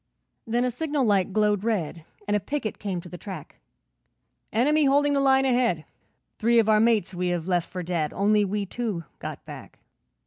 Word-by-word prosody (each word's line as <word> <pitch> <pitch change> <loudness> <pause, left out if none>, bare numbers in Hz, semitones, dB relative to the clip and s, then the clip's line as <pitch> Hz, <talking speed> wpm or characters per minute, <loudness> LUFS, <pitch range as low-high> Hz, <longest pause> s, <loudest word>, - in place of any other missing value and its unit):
Then 240 +2 +1
a 250 - 0
signal 290 +1 -1
light 200 -3 +2
glowed 210 -1 +2
red, 170 -8 -2 0.2
And 205 - +1
a - - +3
picket 225 +1 -4
came 190 -4 -3
to 175 - -12
the 180 - -9
track. 185 -7 -9 0.9
'Enemy 295 +7 +3
holding 285 +1 +3
the 280 - +2
line 270 -1 +4
ahead, 245 -11 +1 0.5
Three 235 +2 +3
of 225 -2 +4
our 215 -1 +5
mates 220 -5 +2
we 180 0 -2
have 175 -1 -2
left 175 -2 0
for 180 -1 -5
dead, 165 -3 -1
Only 210 +1 +2
we 205 +1 -1
two 210 -4 -3 0.2
got - - -7
back.' - - -10
210 Hz, 185 wpm, -25 LUFS, 180-245 Hz, 0.9 s, our